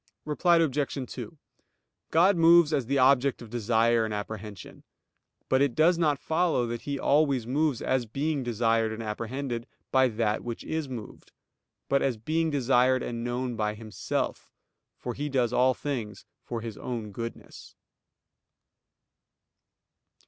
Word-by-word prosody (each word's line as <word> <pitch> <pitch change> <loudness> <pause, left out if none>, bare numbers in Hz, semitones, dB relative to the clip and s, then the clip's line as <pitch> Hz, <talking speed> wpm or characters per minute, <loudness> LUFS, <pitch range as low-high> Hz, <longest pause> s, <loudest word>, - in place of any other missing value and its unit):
Reply 170 +3 +3
Obj. 140 -4 -1
2: 160 - -8 0.7
God 185 +5 +4
moves 165 -1 +6
as 135 -6 0
the 140 +2 +1
object 135 0 +4
of 115 -3 -11
desire 115 0 +2
and 110 - -3
apprehension; 105 -2 -7 0.6
but 130 0 +2
it 140 -4 +2
does 165 +2 +4
not 150 -4 +2
follow 160 -4 +1
that 120 0 -4
He 140 - -1
always 140 -4 +2
moves 140 +1 0
as 125 -3 0
being 145 +5 -1
desired 115 -2 +1
and 110 +1 -5
apprehended 120 +3 -4 0.2
by 130 0 +5
that 110 -2 -1
which 120 -1 -5
is 160 -3 -3
moved; 120 -5 -9 0.6
but 140 - +2
as 130 -4 0
being 160 +8 0
desired 130 -2 +2
and 115 -1 -4
known 120 0 -2
by 105 -1 -1
Himself; 110 -3 -4 0.5
for 125 - -5
He 145 +3 -4
does 125 -3 +1
all 130 +1 +3
things 115 -8 -5 0.2
for 115 -2 -5
His 115 -2 -7
own 115 -4 -5
goodness. 115 +3 -8
125 Hz, 140 wpm, -27 LUFS, 115-145 Hz, 0.7 s, moves